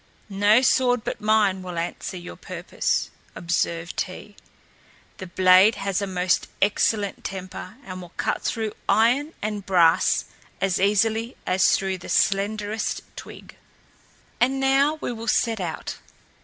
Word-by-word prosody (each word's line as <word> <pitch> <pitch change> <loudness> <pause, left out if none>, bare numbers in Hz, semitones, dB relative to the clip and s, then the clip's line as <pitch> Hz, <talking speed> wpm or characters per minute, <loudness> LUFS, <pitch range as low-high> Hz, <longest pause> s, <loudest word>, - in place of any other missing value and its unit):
"No 205 +5 +4
sword 245 -3 +3
but - - -5
mine 210 -3 +2
will 180 -2 -7
answer 170 +2 -4
your 175 - -9
purpose," - - -3 0.2
observed 170 -1 -2
he; 205 +2 -8 0.8
"the 185 - -7
blade 185 +4 +5
has 195 0 -2
a 200 - -2
most 180 -1 0
excellent 205 0 +1
temper 185 +1 -7
and 185 -1 -7
will 175 -1 -11
cut - - -1
through 220 -2 -2 0.2
iron 245 +9 +3
and 210 -1 -3
brass 175 -4 +3 0.3
as 195 -2 0
easily 220 +4 +1
as 190 +1 +3
through 190 -1 -3
the - - -10
slenderest 210 +2 0
twig. - - -11 0.8
And 265 +2 +2
now 275 +3 +3
we - - -2
will 230 -1 -7
set 235 -3 +1
out. 175 -3 -5
200 Hz, 135 wpm, -24 LUFS, 185-225 Hz, 0.8 s, blade